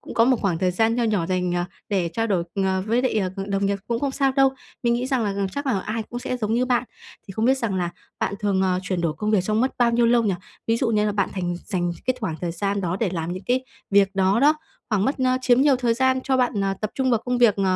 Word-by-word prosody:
cũng - - -9
có 230 - +5
một 260 0 +4
khoảng 180 -5 0
thời 185 -1 +1
gian 225 +5 +2
nho 240 -1 +1
nhỏ 205 -7 +1
dành, 180 -1 0
à, 175 0 -1 0.2
để 185 -5 0
trao 225 0 0
đổi 185 -5 0
ng 190 -1 0
với 235 +3 +2
lại, 260 - 0
ờ, 190 0 -2
đồng 195 0 0
nghiệp 200 0 0
cũng 235 -1 -1
không 280 - 0
sao 270 0 +1
đâu. 270 0 +4 0.3
Mình 235 -1 +2
nghĩ 245 +2 -1
rằng 260 -4 0
là 200 - 0
g 195 - -5
chắc 285 0 -4
là 220 -8 +1
ai 220 +3 -3
cũng 240 +3 -7
sẽ 250 +1 -3
giống 220 -2 -1
như 245 +2 +2
bạn. 250 -1 +1 0.4
Thì - - -6
không 220 +4 -1
biết 265 +2 +3
rằng 220 -6 -1
là 175 -2 -1 0.3
bạn 200 - 0
thường, 195 -2 +1
à, 185 -1 +1
chuyển 185 -1 -2
đổi 165 -3 0
công 210 +5 -1
việc 210 -4 +4
trong 215 +2 +1
mất 260 +2 +1
bao 240 -1 +4
nhiêu 235 0 +3
lâu 235 0 +4
nhỉ? 200 -4 +1 0.3
Ví 225 0 +2
dụ 245 - 0
như 215 -2 +2
là 210 - 0
bạn 200 -2 0
thành 175 -2 -2
dành 175 -4 -1 0.2
cái 255 - +1
thoảng 185 -8 -2
thời 170 -2 -2
gian 200 +3 -1
đó 180 0 -1
để 225 - +2
làm 165 0 -3
những 185 +2 -7
cái 255 +1 +1 0.3
việc 195 -1 +4
đó 195 +4 +2
đó, 295 +2 +5 0.4
khoảng 205 -2 +2
mất, 270 - +1
a, 255 0 +2
chiếm 250 -1 +4
nhiều 275 -2 +5
thời 240 -2 +1
gian 260 +1 +2
cho 265 -1 +2
bạn, 240 -6 +1
à, 195 0 0
tập 215 0 -2
trung 265 -1 +1
vào 235 - +3
công 250 0 0
việc, 235 -4 +5
ờ, 195 - 0
215 Hz, 300 wpm, -23 LUFS, 190-245 Hz, 0.4 s, có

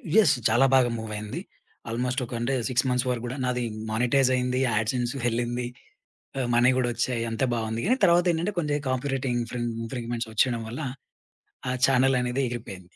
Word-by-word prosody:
Yes! 220 -9 +6
చాలా 120 +5 +5
బాగా 125 -2 +5
మూవయింది. 105 -1 -5 0.5
ఆల్‌మోస్టొక 125 +2 -2
అంటే 120 +3 0 0.2
6 125 +1 +1
మంత్స్ 125 +1 +1
వరకు 120 -1 -1
గూడా 125 +3 -4
నాది 125 -1 0 0.3
మానిటైజ్ 125 +4 +3
అయింది 125 0 0
యాడ్‌సెన్స్ 120 +3 0
వెళ్ళింది. 120 +1 -1 0.7
ఆహ్, 125 - 0
మనీ 120 +2 +5
గూడా 125 -1 +1
వచ్చాయి 120 0 -1
అంతా 115 +4 0
బావుంది 110 0 -2
గానీ 255 +5 +3
తర్వాతేంటంటే 175 +2 +3
కొంచెం 150 -3 0
కాపీ 130 +2 -1
రైటింగ్ 125 -2 -1
ఇన్‌ఫ్రింగ్ 120 0 -3
ఇన్‌ఫ్రింగ్‌మెంట్స్ 115 -1 -4
వచ్చేయడం 115 +1 +2
వల్ల 125 +7 -5 0.9
ఆ 125 - 0
చానెలనేది 130 0 +2
ఎగిరిపోయింది. 95 -7 -8
125 Hz, 155 wpm, -26 LUFS, 115-130 Hz, 0.9 s, Yes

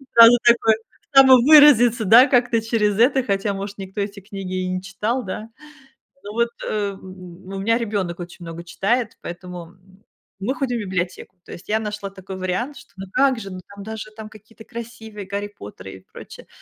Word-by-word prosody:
Сразу 230 +1 +9
такое, 235 -2 +4 0.4
самовыразиться, 260 -3 +7
да, 230 +6 +8
как-то 245 -4 +2
через 215 -2 0
это, 260 +3 +4
хотя, 200 -1 -1
может, 200 +1 -6
никто 195 +1 -6
эти 200 0 -5
книги 190 -2 -5
и - - -3
не 185 0 -3
читал, 210 +6 -3
да? 210 +3 -6 0.8
Ну 205 +1 -8
вот, 235 +1 +1 0.2
ам, 200 -2 -3 0.5
н 195 - -8
у 195 - -4
меня 230 +4 +1
ребёнок 200 -7 -3
очень 175 0 -9
много 165 +1 -8
читает, 220 +7 -1
поэтому, 175 0 -8
м, 185 +2 -23 0.4
мы 245 +8 -2
ходим 245 -3 -2
в - - -3
библиотеку. 185 -1 -4
То - - -13
есть 175 - -12
я 220 +1 +1
нашла 210 -2 -5
такой 190 0 -9
вариант, 190 +10 -3
что, - - -16
ну 195 - -7
как 265 -2 +2
же, 195 -3 -8
ну, 185 - -7 0.2
там, 200 - -9
даже, 220 0 -7
там, 220 -1 -8
какие-то 220 +1 -16
красивые, 220 -4 -9
Гарри 205 +1 -3
Поттеры 95 -2 -10
и 95 - -14
прочее. - - -12
210 Hz, 190 wpm, -21 LUFS, 190-235 Hz, 0.8 s, Сразу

